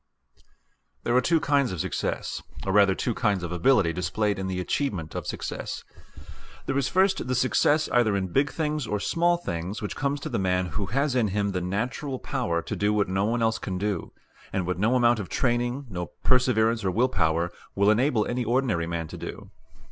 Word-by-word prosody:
There 120 - +1
are 125 - +5
two 165 +3 +3
kinds 140 -4 +2
of 90 - -4
success, - - -2 0.2
or 95 - 0
rather 100 -2 +5
two 120 - -1
kinds 105 -7 0
of 85 - -4
ability 90 -1 +3
displayed 95 +4 -1
in 95 - -2
the 95 -1 -2
achievement 90 - -2
of - - -5
success. - - -4 0.8
There - - -1
is, 140 -1 +1
first, 190 0 +2
the 130 - 0
success 145 +4 +3
either 115 -4 +3
in 95 -2 -2
big 140 +2 +3
things 150 -5 -2
or 105 - -1
small 175 +8 +2
things 90 - -4
which 105 - -4
comes 140 0 -1
to 155 - -4
the 120 - -1
man 90 -1 +1
who 100 +2 -2
has 140 +5 0
in 120 -4 +2
him 100 0 0
the 90 -1 -2
natural 120 +9 -2
power 120 - -2
to - - -4
do 105 +1 +1
what 105 -2 +1
no 95 +2 +1
one 115 +2 0
else 115 0 +1
can 95 -4 -4
do, 100 +2 -2 0.4
and 95 -2 -1
what 90 0 -2
no 115 +6 +3
amount 120 -2 +4
of 95 - -5
training, 120 +2 0
no 90 -5 -4 0.2
perseverance 115 -3 +3
or 95 - +1
will 115 +8 +2
power, 85 -6 +1 0.2
will 100 +1 +4
enable 115 -1 +2
any 125 +1 -1
ordinary 115 -8 +1
man 85 -1 -3
to - - -8
do. - - -8
110 Hz, 205 wpm, -26 LUFS, 95-130 Hz, 0.8 s, are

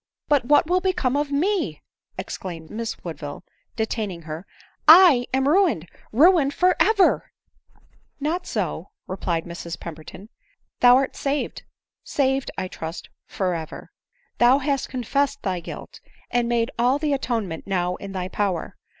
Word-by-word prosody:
" - - -68
But 275 -4 +3
what 290 +3 +5
will 360 +3 +1
become 360 -9 0
of 290 0 0
me 315 - 0 0.2
?" - - -44
exclaimed 175 -3 -6
Miss 230 +1 -5
Woodville, 160 -2 -7 0.3
detaining 215 -6 -3
her 160 +4 -7
— - - -28
" - - -2
J 320 -8 +8
am 265 +1 +1
ruined 320 - +3 0.2
— - - -32
ruined 290 - +4
for 365 0 +3
ever 405 -2 +3 0.3
!" - - -33
" - - -37
Not 360 +2 -3
so," - - -3 0.2
replied 175 -3 -2
Mrs 170 -1 -7
Pemberton, 170 +5 -10 0.2
" - - -48
thou 245 0 +7
art 265 +1 +1
saved 280 +1 -2 0.3
— - - -67
saved, 270 -1 +2
I 185 - -2
trust, 165 -1 -7 0.2
for 185 -2 -1
ever. 160 -2 -7 0.5
Thou 245 +2 +6
hast 280 -1 -1
confessed 275 +3 -1
thy 185 -3 -1
guilt, 170 - -9 0.3
and 240 -1 +1
made 235 -1 +1
all 250 +3 +3
the 295 -1 0
atonement 225 -12 -3
now 180 -2 0
in 195 - -8
thy 185 -1 -3
power. 190 -3 -2
240 Hz, 165 wpm, -23 LUFS, 180-285 Hz, 0.5 s, J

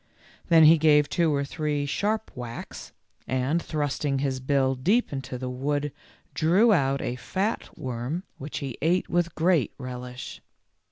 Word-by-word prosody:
Then 165 -2 +7
he 160 +1 +7
gave 150 -2 +5
two 170 +1 +1
or 140 -1 +1
three 150 -1 -2
sharp 215 +9 -1
whacks, 120 -3 -8 0.4
and 130 +6 0
thrusting 145 -3 -1
his 135 -1 -1
bill 135 0 +1
deep 185 - +1
into 130 -1 -5
the 130 +1 -5
wood 145 +3 -2 0.4
drew 190 +8 +4
out 140 -5 +1
a 120 - -2
fat 190 - -3
worm 130 +7 -4 0.2
which 140 +3 -6
he 130 -4 -6
ate 175 +4 +1
with 175 -1 0
great 160 - +2
relish. 125 -1 -7
145 Hz, 150 wpm, -26 LUFS, 130-165 Hz, 0.4 s, Then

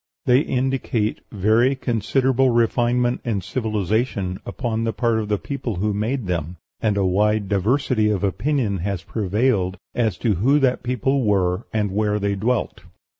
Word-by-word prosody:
They 125 +1 +5
indicate 130 -6 -1
very 110 +6 +3
considerable 130 +1 +1
refinement 120 +1 +1
and 105 -6 -2
civilization 105 -3 -1
upon 115 -4 -2
the 115 -1 -1
part 115 -2 +1
of 110 - -3
the 105 0 +1
people 130 -2 -4
who 105 +4 -1
made 110 +4 -2
them; 90 -1 -3 0.2
and 105 -3 +1
a 100 - +2
wide 105 +2 +2
diversity 110 +3 +1
of 105 -2 -1
opinion 110 -1 0
has 95 -1 -3
prevailed 100 -1 0 0.2
as 110 -6 0
to 110 - +4
who 125 - +3
that 130 -3 +2
people 130 +2 0
were 95 -4 +1
and 105 -3 0
where 105 +1 +1
they 100 -1 0
dwelt. 110 +4 -1
110 Hz, 155 wpm, -22 LUFS, 100-125 Hz, 0.2 s, They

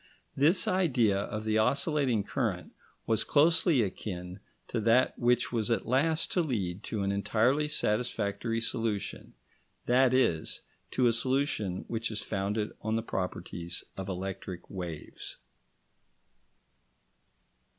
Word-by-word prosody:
This 155 +7 +3
idea 135 - +3
of 105 +1 -4
the 110 0 +2
oscillating 135 -1 +2
current 105 -7 -2 0.3
was 110 -1 +2
closely 160 -2 +4
akin 90 -2 -5 0.3
to 120 - -1
that 115 +4 +4
which 120 0 +2
was 115 -2 0
at 115 - +1
last 155 +7 +1
to 180 - +2
lead 100 - -2
to 105 -3 -2
an 100 - +1
entirely 115 +9 +2
satisfactory 115 -3 0
solution: 115 -3 -3 0.5
that 125 +1 +4
is, 110 -12 +1 0.3
to 130 - +1
a 120 - +4
solution 115 -7 -1
which 115 0 -2
is 110 -2 -3
founded 105 +2 -2
on 110 +1 -1
the 115 - -1
properties 85 -2 -4
of 95 0 -5
electric 95 -1 -5
waves. 85 -5 -7
115 Hz, 120 wpm, -30 LUFS, 100-130 Hz, 0.5 s, closely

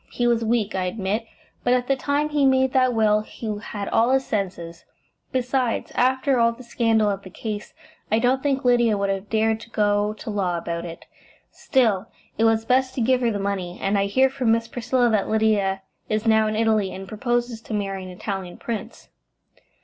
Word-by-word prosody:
"He 245 - -2
was 235 -1 +2
weak, 220 -2 0
I 185 -1 -1
admit, 205 +4 -2 0.4
but 245 0 +3
at 250 -1 0
the 275 - +2
time 285 +2 0
he 295 -1 +1
made 265 -1 +3
that 255 -2 +3
will 215 -1 +3
he 215 0 -6
had 205 -2 -5
all 230 +2 +3
his 265 0 +2
senses. 175 -5 -4 0.5
Besides, 255 -1 -1
after 260 +1 +2
all 230 0 +3
the 245 +2 -13
scandal 225 -2 +1
of 200 -1 -1
the 190 - -11
case, 210 +2 -6 0.4
I 220 - +4
don't 250 +3 +2
think 275 -2 -1
Lydia 240 -3 +4
would 200 0 0
have 195 +1 -4
dared 220 0 +1
to 230 - -13
go 210 -1 +1
to 215 - -9
law 185 -4 -1
about 170 0 -4
it. 165 -1 -9 0.5
Still, 225 -6 +1 0.3
it 225 - +4
was 225 0 +2
best 255 +2 +2
to 255 - -1
give 255 +2 +2
her 240 - +2
the 210 - -1
money, 195 -3 -3
and 195 +1 0
I 200 0 +2
hear 260 +6 +3
from 260 -4 +1
Miss 230 0 +1
Priscilla 245 +1 +1
that 210 -3 +1
Lydia 205 -3 +1 0.3
is 215 +1 -1
now 220 -1 +4
in 215 - -1
Italy, 220 -3 +1
and 190 +1 -8
proposes 240 +2 -2
to 225 - -8
marry 195 -2 -3
an 185 - -8
Italian 185 0 -5
prince." 220 -4 -6
220 Hz, 205 wpm, -23 LUFS, 200-245 Hz, 0.5 s, I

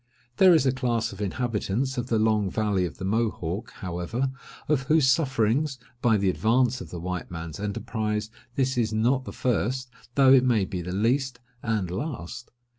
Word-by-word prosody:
There 185 -2 +7
is 155 - +3
a 130 - +4
class 120 -4 -1
of 100 - -9
inhabitants 120 +4 -1
of 120 -2 -3
the 115 - +1
long 110 -2 +2
valley 100 -2 0
of 65 -6 -11
the - - -5
Mohawk, 105 -1 -1
however, 95 +9 -3 0.4
of 150 -3 +2
whose 155 -2 +4
sufferings, 135 0 +2 0.2
by 115 -3 +4
the 100 -1 0
advance 125 +4 +2
of - - -8
the 90 - -6
white 90 +1 -4
man's 80 -1 -6
enterprise, 105 +1 -2 0.2
this 130 -2 +1
is 110 -2 +1
not 125 +5 +1
the - - -6
first, 125 +2 -1 0.2
though 135 -1 +7
it 130 -2 +6
may 115 -6 +3
be 90 -1 -4
the 90 +1 -5
least, 125 +6 0 0.2
and 105 -6 -1
last. 120 - -5
115 Hz, 180 wpm, -26 LUFS, 100-130 Hz, 0.4 s, There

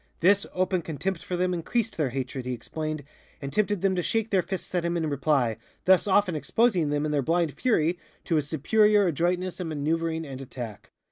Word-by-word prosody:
This 200 +3 +4
open 185 0 +1
contempt 165 +4 -3
for 180 - -3
them 180 0 +1
increased 220 +7 -1
their 150 -5 0
hatred, 130 0 -4
he 125 - -1
explained, 155 +4 -4 0.4
and 140 -1 -6
tempted 205 -1 +1
them 195 -1 +2
to 180 - +1
shake 225 +4 -1
their 190 -2 +4
fists 185 +1 -5
at 175 -2 +1
him 170 0 0
in 160 -2 -1
reply, 140 -5 +1 0.3
thus 190 +2 +5
often 190 -3 +3
exposing 175 - +2
them 145 +1 0
in 150 - -1
their 145 -1 +2
blind 165 +1 +1
fury 175 -8 +1 0.2
to 165 - +1
his 150 -1 -1
superior 210 +7 +4
adroitness 180 +3 0
in 180 - -3
maneuvering 160 +2 -1
and 135 -2 -7
attack." 120 -5 -8
165 Hz, 200 wpm, -27 LUFS, 145-185 Hz, 0.4 s, thus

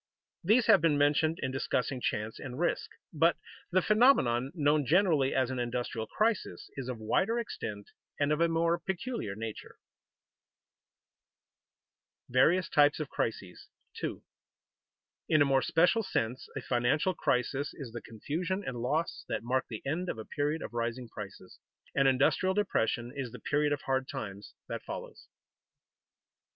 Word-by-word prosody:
These 220 +6 +4
have 190 - +6
been 155 -3 +3
mentioned 150 +3 +3
in 130 - -1
discussing 130 0 -1
chance 110 0 -2
and 130 -2 -7
risk; 175 - 0 0.2
but 165 +2 +3 0.3
the 185 0 +2
phenomenon 170 - +4
known 150 -1 +3
generally 155 -3 +3
as 130 -1 +1
an 130 - -3
industrial 120 -2 -2
crisis 210 - -1
is 130 -2 -5
of 125 - -3
wider 185 - +1
extent 105 - -5 0.3
and 145 0 +2
of 150 +2 +1
a 170 - +5
more 165 +1 +1
peculiar 190 - -3
nature. 110 0 -7 2.5
[Sidenote: - - -18
Various 180 0 +2
types 145 +1 +4
of 155 - -3
crises] 95 -5 -4 0.3
2. - - -4 1.1
_In 155 -2 +5
a - - +1
more 135 -1 +3
special 170 - +3
sense 125 - -2
a - - -3
financial 125 +9 +1
crisis 135 0 0
is 135 -6 -7
the 120 0 -6
confusion 180 - -3
and 125 - -4
loss 150 +7 -1
that - - -2
mark 130 +2 0
the 110 -3 -6
end 170 +6 -2
of - - -3
a 110 - -7
period 150 +2 -1
of - - -7
rising 120 +1 -3
prices; 100 -3 -10 0.3
an 140 -1 +3
industrial 140 +8 +3
depression 120 - 0
is 130 -4 -4
the - - -8
period 150 0 +1
of 145 - -1
hard 130 0 -1
times 100 -1 -7
that - - -4
follows. - - -8
140 Hz, 155 wpm, -31 LUFS, 120-170 Hz, 2.5 s, have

